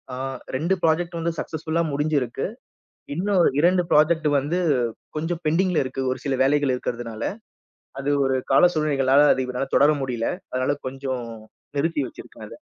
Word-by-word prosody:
ஆ - - -6 0.4
2 165 +8 +1
project 170 +2 +1
வந்து 170 +1 -1
சக்ஸஸ்ஃபுள்ளா 160 +1 -2
முடிஞ்சிருக்கு. 140 -4 -1 0.7
இன்னும் 185 +1 +2
2 180 +2 +4
ப்ராஜெக்ட் 155 +1 +4
வந்து 160 +7 -1 0.6
கொஞ்சம் 165 +2 -2
பெண்டிங்ல 175 +2 +2
இருக்கு, 130 +1 -4
ஒரு - - -3
சில 135 -1 +1
வேலைகள் 140 -1 +2
இருக்குறதுனால. 115 -2 -5 0.8
அது 140 +1 -1 0.2
ஒரு 130 0 +1 0.2
கால 135 - +6
சூழ்நிலைகளால 145 -2 +3
அது 130 - 0
இப்ப 125 0 -6
என்னால 135 +2 -2
தொடர 145 +2 +6
முடியல. 120 -3 -2 0.2
அதனால 130 +3 0
கொஞ்சம் 130 -2 -4 0.5
நிறுத்தி 160 0 0
வச்சிருக்கேன் - - -12
அதை. - - -12
145 Hz, 145 wpm, -23 LUFS, 130-165 Hz, 0.8 s, கால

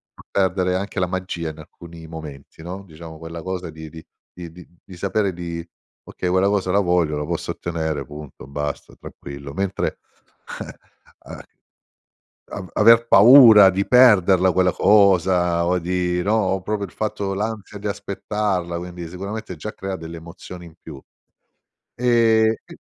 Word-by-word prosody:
fa - - -16
perdere 95 -1 0
anche 100 +1 -3
la 90 - +2
magia 90 -2 -4
in 75 - -15
alcuni 85 -1 -13
momenti 80 -3 -10
no, 95 +3 -7
diciamo 80 -2 -12
quella 85 0 -8
cosa 90 -2 -5
di 80 0 -10
di 80 0 -12 0.3
di 85 -2 -9
di 90 +1 -14 0.2
di 90 - -13
sapere 100 +1 -1
di: 85 -1 -6 0.4
"Okay, 90 - -5
quella 95 +2 +2
cosa 100 -2 0
la 100 - +3
voglio, 90 -5 +1
la 75 - -3
posso - - -3
ottenere" 80 -4 -3
punto, 75 -1 -11
basta, 75 +1 -5
tranquillo. 70 0 -10
Mentre, 95 +3 -3 0.6
eh, - - -8 0.6
a - - -9 1.1
av 90 - -7
aver 115 +2 +7
paura 110 -3 +8
di 95 +1 -1
perderla 95 -7 +5
quella 90 0 +2
cosa 90 -4 +3
o 90 +1 +1
di 90 0 -1
no, 105 - +1
o 95 -3 0
proprio 100 +1 -3
il - - -19
fatto 105 -2 -3
l'ansia 105 0 -5
di 105 - -5
aspettarla, 100 -3 -3
quindi 90 0 -7
sicuramente 95 +3 -7
già 105 +8 -7
crea 95 -2 -5
delle 85 -1 -8
emozioni 85 +2 -11
in 85 - -14
più. 75 -4 -10 1.0
E 115 -2 +3
c - - -13
90 Hz, 155 wpm, -21 LUFS, 85-100 Hz, 1.1 s, paura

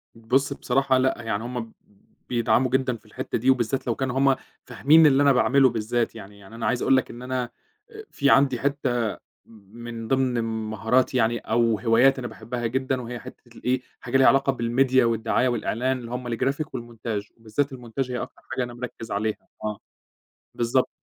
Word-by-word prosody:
بُص 125 +5 0
بصراحة 135 0 +1
لأ، 130 -2 +1
يعني 110 -2 -2
هُم 120 -2 -5 0.6
بيدعموا 120 +1 +2
جدًا 130 -1 +1
في 110 - -28
الحتّة 110 - -4
دي 125 +3 +1
وبالذات 130 +1 +1
لو 120 - +1
كانوا 130 0 -2
هُم 135 0 +4 0.3
فاهمين 160 +3 +5
اللي 140 0 +4
أنا 140 - +6
باعمله 135 +1 +4
بالذات 115 +1 -1
يعني، 100 -2 -11
يعني 100 +3 -13
أنا 115 - -4
عايز 120 - 0
أقول 135 0 +4
لك 130 - -1
إن 120 - -10
أنا 125 -1 -3 0.4
آآ، 435 0 -10
في 140 -1 +1
عندي 135 -3 +4
حتّة 125 -5 0 0.3
م 105 -1 -18
من 115 -1 -6
ضمن 130 -2 +1
مهاراتي 110 +3 0
يعني 120 0 +2
أو 115 0 +1
هوايات 125 +3 +4
أنا 120 - -4
باحبها 120 +1 -4
جدًا 130 +2 -1
وهي 120 0 -6
حتّة 120 -2 -14
الإيه، 130 +1 0 0.2
حاجة 125 +2 0
ليها 135 - +6
علاقة 135 -1 +3
بالMedia 130 +3 +2
والدعاية 115 +2 +1
والإعلان 125 +1 -1
اللي 120 -1 -9
هُم 125 0 -4
الGraphic 140 +5 0
والmontage 115 -6 -6
وبالذات 120 +6 -2
الmontage 125 +1 -4
هي 125 - -2
أكتر - - -9
حاجة 130 - 0
أنا 120 0 -6
مركّز 120 -2 -7
عليها 105 +2 -1 0.3
آه، 105 -1 -3 0.8
بالضبط. 120 +2 +1
125 Hz, 185 wpm, -25 LUFS, 115-130 Hz, 0.8 s, أنا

